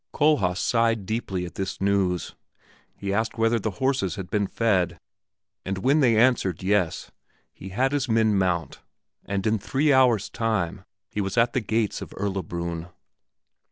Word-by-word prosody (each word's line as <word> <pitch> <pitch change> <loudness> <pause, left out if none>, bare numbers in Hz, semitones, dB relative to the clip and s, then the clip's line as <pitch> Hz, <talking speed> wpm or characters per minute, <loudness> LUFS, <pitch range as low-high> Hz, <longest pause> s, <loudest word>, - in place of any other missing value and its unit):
Kohlhaas 145 -13 +3
sighed 115 -1 +1
deeply 95 -4 -2
at 85 - -9
this 95 -1 -4
news; 95 -3 0 0.6
he 100 0 -3
asked 110 +3 -1
whether 115 +1 +2
the 110 - -2
horses 130 -10 0
had 95 -3 -7
been 100 -2 +1
fed, 90 -8 0 0.6
and 95 0 -3
when 135 +10 +2
they 120 -6 +4
answered 110 -8 +2
"Yes," 95 -3 0 0.4
he 95 - -10
had 130 +8 +1
his 145 -2 -1
men 110 -2 +3
mount, 90 -6 0 0.5
and 100 -1 -2
in 110 0 +2
three 140 +8 +1
hours' 125 -6 +4
time 100 -4 -2 0.2
he 105 - -3
was 95 +3 -3
at 120 +1 +3
the 130 - +1
gates 110 -1 -1
of - - -9
Erlabrunn. 85 -4 -3
105 Hz, 160 wpm, -25 LUFS, 95-115 Hz, 0.6 s, they